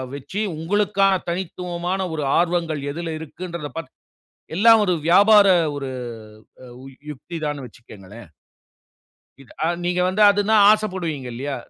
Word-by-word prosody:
வச்சு 190 +9 -5 0.2
உங்களுக்கான 195 +3 +1 0.2
தனித்துவமான 180 +1 -4
ஒரு 155 -2 -3
ஆர்வங்கள் 170 -3 0
எதில 165 +2 -5
இருக்குன்றத 170 0 -7
பார்த்து 165 -5 -7 0.6
எல்லா 220 +6 +6
ஒரு 180 - +1
வியாபார 205 +3 +6 0.3
ஒரு 140 -2 -5 1.2
யுக்தி 150 +4 -9
தான்னு 145 -2 -4
வச்சுக்கங்களேன். 105 -3 -14 1.1
இது 130 - -18 0.3
நீங்க 180 0 0
வந்து 190 +3 -1
அதுனா 205 +2 +1 0.2
ஆசைப்படுவீங்க 185 -10 -2
இல்லையா? 135 +4 -4
170 Hz, 110 wpm, -21 LUFS, 145-190 Hz, 1.2 s, எல்லா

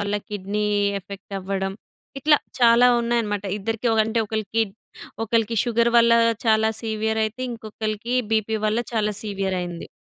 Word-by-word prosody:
వల్ల 205 0 -1
kidney 205 0 -3 0.4
effect 200 +1 -11
అవ్వడం, 195 0 -3 0.5
ఇట్లా 300 +1 +5 0.2
చాలా 240 +1 +6
ఉన్నాయన్నమాట 230 -4 -1
ఇద్దరికి. 225 +3 -2 0.2
అంటే 225 +1 -1
ఒ - - -34
ఒకళ్ళకి 220 +1 0 0.6
ఒకళ్ళకి 230 0 0
షుగర్ 235 0 +2
వల్ల 235 0 +5 0.3
చాలా 220 0 +4
సివియరయితే, 220 +1 -1
ఇంకొకళ్ళకి 220 +1 -4 0.2
బీపీ 220 0 +1
వల్ల 215 +2 +1
చాలా 215 -2 0
సివియరయింది. 190 -4 -3
220 Hz, 125 wpm, -23 LUFS, 205-230 Hz, 0.6 s, చాలా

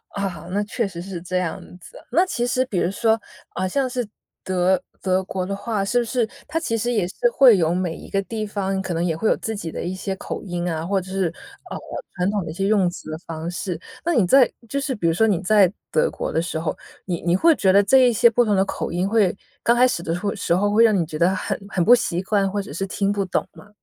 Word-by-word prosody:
啊， 190 -6 -4
那 205 +2 0
确 220 +1 -2
实 170 -3 -7
是 180 -1 -6
这 180 +1 -2
样 180 -3 -2 0.2
子。 - - -14
那 360 - +4
其 240 -10 -2
实 255 +1 +1
比 200 -8 -2
如 175 - +1
说， 225 +2 +2 0.4
呃， 185 - -1
像 265 +6 0
是 245 -3 -3 0.4
德 185 0 +1 0.2
德 185 0 +1
国 185 -1 -3
的 195 +1 -3
话， 200 0 -2
是 245 +5 +2
不 - - +1
是 230 0 0 0.2
它 325 - -1
其 280 -9 -2
实 240 +3 -1
也 210 -7 +1
是 - - -9 0.2
会 255 - +7
有 165 -1 +2
每 180 -3 -1
一 - - -11
个 195 - 0
地 215 +1 -4
方 195 -2 -2
可 190 -2 -3
能 165 +1 -1
也 165 -2 0
会 215 +7 0
有 - - +2
自 220 - -4
己 170 -6 -5
的 - - -5
一 180 - -3
些 190 +1 -4
口 - - -6
音 175 -3 -3
啊。 160 -1 -3
或 195 +2 +1
者 185 0 -9
是， 190 -2 0 0.4
呃， - - -5 0.4
传 180 +1 0
统 205 -2 -1
的 160 - -7
一 - - -5
些 195 +3 -2
用 200 -4 +3
词 165 -2 -9
的 155 - -4
方 165 0 -5
式？ 180 -2 -4 0.2
那 345 - +1
你 230 - +3
在 255 +7 +5 0.2
就 280 +5 -2
是 270 -1 -2
比 205 - -4
如 165 - +3
说 220 +7 +3
你 195 -6 +2
在 195 -1 +4 0.2
德 485 0 +2
国 - - -4
的 160 - +2
时 165 -1 -3
候， 160 0 -2 0.3
你 175 -3 -3
你 175 +1 +2
会 325 - +5
觉 190 -7 +3
得 200 +2 +5
这 235 +7 +5
一 - - 0
些 230 - +5
不 240 +1 +3
同 210 -3 +1
的 190 0 +3
口 - - -4
音 175 +2 0
会 205 -4 +2 0.3
刚 235 - +3
开 250 +1 +5
始 170 - -2
的 165 0 -2
会 200 +3 -2
时 175 -4 0
候 205 +3 +1
会 220 +2 +5
让 220 -2 +5
你 170 - +1
觉 155 -1 -7
得 175 +3 +4
很 - - -2
很 180 -3 0
不 240 - +8
习 230 -8 +1
惯， 195 0 +1
或 205 - -1
者 190 - -9
是 195 +5 -3
听 195 +1 0
不 205 -1 0
懂 180 - -1
吗？ 210 - -15
195 Hz, 295 characters per minute, -22 LUFS, 180-225 Hz, 0.4 s, 不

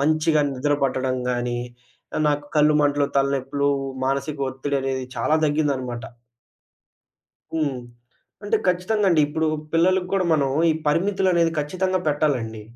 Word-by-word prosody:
మంచిగా 155 +1 +2
నిద్ర 140 +3 0
పట్టడం 130 -1 0
గాని, 120 0 -1 0.6
ఆహ్, - - +1
నాకు 145 0 0
కళ్ళు 150 0 +5
మంటలు, 145 -1 +2
తలనొప్పులు, 140 +1 +1 0.3
మానసిక 140 +2 -1
ఒత్తిడనేది 135 -1 -2
చాలా 120 +7 +1
దగ్గిందనమాట. 135 -6 -1 1.5
హ్మ్. 145 -5 -1 0.6
అంటే 205 - +1
ఖచ్చితంగండి, 180 -1 +2
ఇప్పుడు 160 +2 -1 0.2
పిల్లలకి 180 +2 +2
కూడా, 190 - +2
మనం 140 -4 +2 0.2
ఈ - - +3 0.2
పరిమితులనేవి 175 0 +2
ఖచ్చితంగా 185 +5 -1
పెట్టాలండి. 130 -8 -1
145 Hz, 115 wpm, -23 LUFS, 135-165 Hz, 1.5 s, కళ్ళు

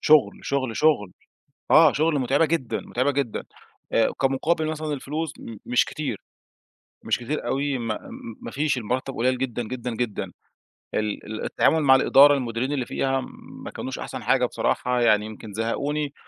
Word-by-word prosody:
شغل، 155 -2 +4
شغل، 130 -5 -1
شغل 140 -12 +2 0.6
آه، 155 -2 +8
شغل 155 -1 +2
متعبة 135 +5 +3
جدًا، 150 -7 -1
متعبة 130 +4 0
جدًا. 135 -5 -2 0.5
آآ، 115 - +3
كمقابل 150 +5 +1
مثلًا 155 -1 -3
الفلوس، 150 +3 -4
م 115 - -8
مش 125 - +3
كتير، 155 -1 -4 0.8
مش - - +1
كتير 120 +1 -3
أوي، 140 +1 0
ما 115 -3 -3 0.4
ما - - -7
فيش، 145 -2 0
المرتّب 125 +4 -2
قليل 125 +2 +1
جدًا، 125 -2 -2
جدًا، 125 +1 -5
جدًا. 120 -3 -3 0.6
ال 105 -1 -2
ال 110 0 -5
التعامل 160 - +2
مع 135 -2 +6
الإدارة، 145 +2 +7
المديرين 125 +1 -2
اللي 130 -4 -1
فيها 135 0 0 0.4
ما - - -6
كانوش - - -6
أحسن - - -6
حاجة - - +3
بصراحة، 125 0 0
يعني 105 -3 +4
يمكن 110 -1 -9
زهقوني. 140 +7 -2
130 Hz, 160 wpm, -24 LUFS, 120-145 Hz, 0.8 s, آه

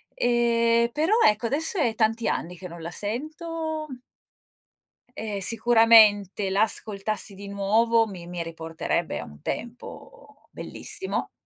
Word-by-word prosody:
Ehm, 235 -1 +2
però 315 - +1
ecco, 215 +2 +2
adesso 315 - -1
è 245 -9 +2
tanti 225 +1 +1
anni 175 +1 -2
che 180 - -8
non 170 -1 -10
la 165 - -5
sento 310 - -4 1.3
E 210 -2 -4
sicuramente, 215 -3 +5
l'ascoltassi 205 0 -2
di 200 +1 -10
nuovo 220 +4 +2
mi 185 -5 -9
mi 175 -1 -4
riporterebbe 165 -1 -3
a - - -5
un 75 0 -13
tempo 250 - -8
bellissimo. 385 - -5
220 Hz, 120 wpm, -25 LUFS, 195-240 Hz, 1.3 s, sicuramente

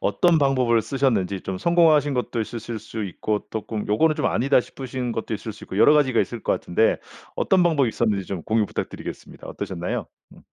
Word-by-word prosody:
어떤 165 - +3
방법을 130 -5 +3
쓰셨는지 110 -8 0
좀 95 0 -5
성공하신 155 - +4
것도 125 -1 -2
있으실 115 0 -5
수 110 +1 -6
있고 105 +2 -2
쪼끔 110 -1 -4
요거는 155 +10 +3
좀 - - -1
아니다 135 +3 +3
싶으신 130 -1 -5
것도 115 -1 -3
있을 110 +1 -6
수 - - -12
있고 - - -7
여러 125 - +6
가지가 135 -6 +3
있을 120 - -3
것 - - +1
같은데 110 +6 +1 0.4
어떤 185 -2 +2
방법이 150 -7 +3
있었는지 105 -4 0
좀 95 -4 -5
공유 110 0 +2
부탁드리겠습니다. - - -7
어떠셨나요? 90 -2 -4 0.3
음. - - -17
115 Hz, 445 characters per minute, -23 LUFS, 105-140 Hz, 0.4 s, 여러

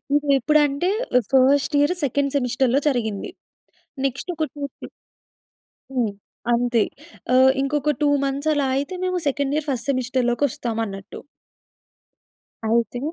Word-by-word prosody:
ఇదెప్పుడంటే, 290 +3 +2 0.3
ఆహ్, 245 - +1
first 275 +3 +4
year 290 +5 +3
second 280 +1 0
సెమిస్టర్‌లో 255 0 +1
జరిగింది. 220 -6 -2 0.7
నెక్స్ట్ 270 +6 -3
ఒకటి 310 -4 -2
చూసి 280 -2 -6 1.1
హ్మ్. 245 -5 0 0.4
అంతే. 240 -1 +2 0.5
ఆహ్, 260 +1 +6
ఇంకొక 295 +2 0
2 295 - +4
మంత్స్ 275 +3 -1
అలా 285 -2 +1
అయితే, 280 +6 -2
మేము 365 0 0
సెకండ్ 280 0 0
ఇయర్ 305 0 -2
ఫస్ట్ 255 0 -2
సెమిస్టర్‌లోకొస్తామన్నట్టు. 240 -5 -2 1.5
అయితే, 235 +2 +1
270 Hz, 110 wpm, -22 LUFS, 245-285 Hz, 1.5 s, ఆహ్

